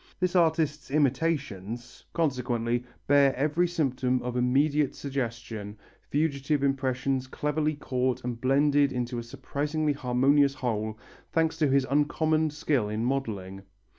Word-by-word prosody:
This 180 0 0
artist's 160 -3 +2
imitations, 125 - -1
consequently, 125 -6 0 0.2
bear 140 -1 +4
every 155 +6 +1
symptom 130 -7 0
of 125 0 -3
immediate 140 +4 +2
suggestion 115 -6 -5 0.3
fugitive 145 -1 0
impressions 135 -1 0
cleverly 150 +3 -1
caught 130 -2 -1
and 120 -1 -4
blended 140 +1 +3
into 120 -1 -2
a - - -5
surprisingly 150 +5 -2
harmonious 140 +2 +3
whole, 110 -4 -2 0.3
thanks 160 -1 +1
to 155 - +3
his 135 0 +3
uncommon 155 +3 +2
skill 145 -7 0
in 110 +2 -2
modelling. 105 -8 -3
135 Hz, 120 wpm, -28 LUFS, 125-150 Hz, 0.3 s, bear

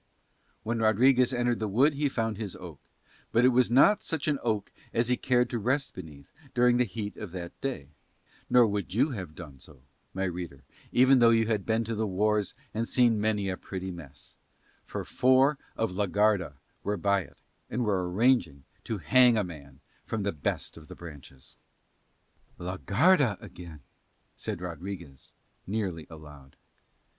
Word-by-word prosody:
When 115 +1 -2
Rodriguez 125 +4 +4
entered 120 -2 0
the 110 - -1
wood 130 +10 +3
he 145 0 0
found 115 -4 -2
his 105 -4 -5
oak, 90 -6 -10 0.5
but 115 +2 +4
it - - +7
was 125 -1 +3
not 200 - +5
such 160 -7 -3
an 145 -3 +1
oak 110 -4 -1 0.2
as 115 +1 +1
he 125 - +3
cared 125 -1 +2
to 120 - -1
rest 130 +6 0
beneath 75 -6 -11 0.2
during 125 0 +4
the 125 - +3
heat 105 -1 -6
of 105 - -6
the 85 -2 -6
day, 130 - -4 0.6
nor 125 -1 +6
would 100 -3 -3
you 140 +6 +3
have 95 -9 -6
done 75 -6 -11
so, 70 -1 -16 0.3
my 95 - -3
reader, 85 -6 -5 0.3
even 130 +1 +5
though 120 -1 +6
you 115 -1 +4
have 105 -3 -1
been 110 +1 +1
to 115 +1 -4
the 110 0 -1
wars 105 +2 0 0.2
and 115 +2 -2
seen 120 -4 +3
many 105 -2 0
a 95 - -1
pretty 95 -1 -6
mess; 75 -5 -12 0.5
for - - -5
four 130 +3 +3 0.2
of 115 -3 0
la 100 +2 -1
Garda 100 -6 +1 0.3
were 105 0 -2
by 100 +1 +2
it - - -14 0.3
and 120 +1 -1
were 95 -4 0
arranging 110 - +2 0.2
to 110 - -3
hang 120 +8 +5
a 105 - +2
man 70 -6 -11 0.2
from 110 -2 -3
the 100 - 0
best 75 +1 -3
of 80 -1 -13
the - - -10
branches. 70 -5 -12 1.0
"La 90 +1 -5
Garda 130 - +3
again," 85 -4 -11 0.5
said - - -5
Rodriguez 85 -5 -8 0.4
nearly 95 -6 -3
aloud. 75 -4 -13
105 Hz, 170 wpm, -28 LUFS, 90-120 Hz, 1.0 s, it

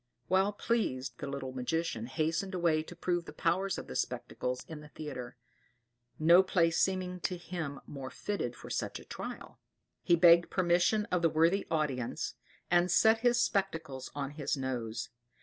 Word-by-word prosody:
Well 190 +2 +3
pleased 135 - -1
the 140 - -4
little 140 -1 -4
magician 130 -2 -2
hastened 160 +7 -1
away 170 -3 +2
to 155 - -10
prove 175 -1 -1
the - - -8
powers 190 +4 0
of - - -6
the 65 - -8
spectacles 125 - -3
in 160 -2 -7
the 150 - -11
theatre; 130 -6 -7 0.8
no 170 +4 +7
place 170 -3 +2
seeming 185 -1 0
to 180 0 -2
him 165 -5 -5
more 135 -2 -7
fitted 165 -12 -3
for - - -10
such - - -2
a - - -13
trial. - - -7 0.4
He 170 - +4
begged 170 0 +6
permission 180 +4 +2
of 180 - +2
the 165 - +4
worthy 165 +5 +2
audience, 140 -7 -1 0.4
and 175 0 +4
set 220 +5 +5
his 240 0 +3
spectacles 160 - -1
on 140 -1 -3
his 145 -1 -2
nose. 125 -4 -3
165 Hz, 165 wpm, -32 LUFS, 135-180 Hz, 0.8 s, no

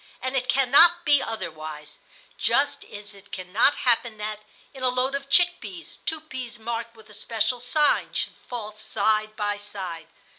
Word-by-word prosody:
And 260 +1 -3
it 255 -1 0
cannot 325 +7 +6
be 290 -3 +5
otherwise, 155 - -6 0.4
just 285 0 +1
as 205 0 -9
it 200 -1 -17
cannot 190 +9 +2
happen 235 -2 +1
that, 210 0 -4 0.3
in 265 - -10
a 255 - +3
load 255 +2 +1
of 275 0 -4
chick 350 +1 +5
peas, 180 -8 -8
two 320 -1 -1
peas 260 -6 -7
marked 230 +1 -4
with 220 -1 -16
a - - -12
special 225 +3 -1
sign 290 +5 +2
should - - -2 0.2
fall 225 -4 -4
side 215 0 0
by 205 -1 -1
side. 190 -5 -7
230 Hz, 170 wpm, -25 LUFS, 205-265 Hz, 0.4 s, cannot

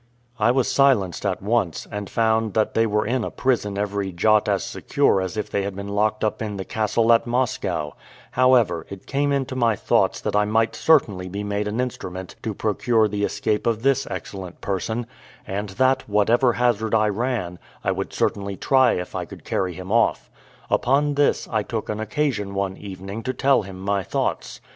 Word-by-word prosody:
I 110 +2 +4
was 130 0 +2
silenced 110 -9 +2
at 95 +1 -2
once, 100 -6 0
and 105 -1 -5
found 110 -2 +1
that 110 -1 +1
they 115 0 +3
were 105 0 +1
in 120 +2 0
a - - -2
prison 110 -6 0
every 100 -1 -2
jot 105 +4 +3
as - - +1
secure 95 - +1
as 95 +2 -4
if 105 - -3
they 100 - 0
had 100 -1 -4
been 100 +1 -6
locked 105 +1 0
up 110 - -1
in 105 -2 -3
the 95 - -5
castle 110 +1 +2
at 115 - +2
Moscow: 120 - -1 0.4
however, 130 -2 +3
it 100 -1 -9
came 140 +1 0
into 135 -2 -1
my 115 -3 +2
thoughts - - +1
that - - -3
I 105 - +4
might 110 +2 +1
certainly 105 -13 +2
be 100 +3 -4
made 105 0 -2
an 105 +3 -3
instrument 95 -7 -4
to 110 -2 -4
procure 110 +2 +2
the 105 0 -3
escape 105 +1 -1
of 115 -1 0
this 135 0 +2
excellent 95 -1 -7
person; 110 +5 -2 0.4
and 100 +2 -4
that, 130 +5 +1
whatever 115 +5 +3
hazard 115 -3 +1
I 110 -1 +3
ran, 105 -5 -2 0.2
I - - +1
would - - -3
certainly 100 -1 -1
try 130 -2 +4
if 90 - -4
I - - -3
could - - -12
carry 90 -1 -1
him 95 +2 -7
off. 115 +1 +2 0.4
Upon 145 +3 +2
this, 145 0 +1
I 110 -2 0
took 110 +1 -4
an 105 - -2
occasion 110 -3 -1
one 100 -1 -1
evening 100 +2 -7
to 130 +3 -3
tell 135 -2 +3
him 95 -2 -9
my 100 +1 0
thoughts. - - -3
105 Hz, 195 wpm, -23 LUFS, 100-120 Hz, 0.4 s, I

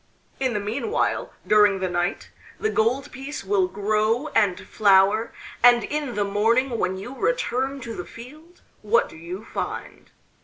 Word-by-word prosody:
In 260 -4 0
the - - +1
meanwhile, 230 - -1
during 210 -2 +4
the 185 - -1
night, 175 -1 -2 0.3
the 435 - 0
gold 250 +6 0
piece 270 +3 -7
will 195 -1 +2
grow 215 +7 0
and 205 -7 +2
flower, 205 +2 +3 0.3
and 240 -1 +7
in 295 -4 -3
the 205 - +1
morning 230 +5 +1
when 190 +1 -1
you 220 +7 -7
return 275 - -1
to 230 -1 -6
the 180 - -5
field, 305 +9 -13 0.2
what 215 +2 +2
do - - -14
you 175 +6 -8
find? - - -6
225 Hz, 155 wpm, -24 LUFS, 200-265 Hz, 0.3 s, and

